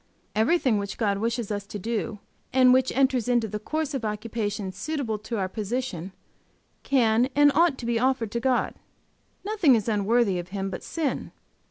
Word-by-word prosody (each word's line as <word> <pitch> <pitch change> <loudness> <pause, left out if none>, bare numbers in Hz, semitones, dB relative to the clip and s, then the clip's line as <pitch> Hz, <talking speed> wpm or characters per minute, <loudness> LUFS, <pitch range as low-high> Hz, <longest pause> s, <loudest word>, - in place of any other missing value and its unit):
Everything 240 -1 +3
which 200 0 -5
God 200 -3 0
wishes 230 0 -2
us 205 -1 -3
to 210 - -6
do, 225 +1 -3 0.3
and 255 -1 +6
which 260 0 +3
enters 260 -3 +2
into 240 -2 +2
the 210 +1 -4
course 305 +6 -3
of 265 -4 -3
occupation 210 -2 -3
suitable 270 -3 -3
to 225 +2 -4
our 190 -2 0
position, 205 -3 -4 0.7
can 240 -2 +3
and 290 0 +6
ought 330 -2 +3
to 240 - -7
be 235 -1 +1
offered 250 -4 +1
to 235 - -1
God; 255 0 +1 0.7
nothing 400 - +4
is 215 -2 -1
unworthy 210 -2 +2
of 175 - -6
Him 195 0 -4
but - - -5
sin. 320 -4 -3
230 Hz, 175 wpm, -26 LUFS, 210-260 Hz, 0.7 s, and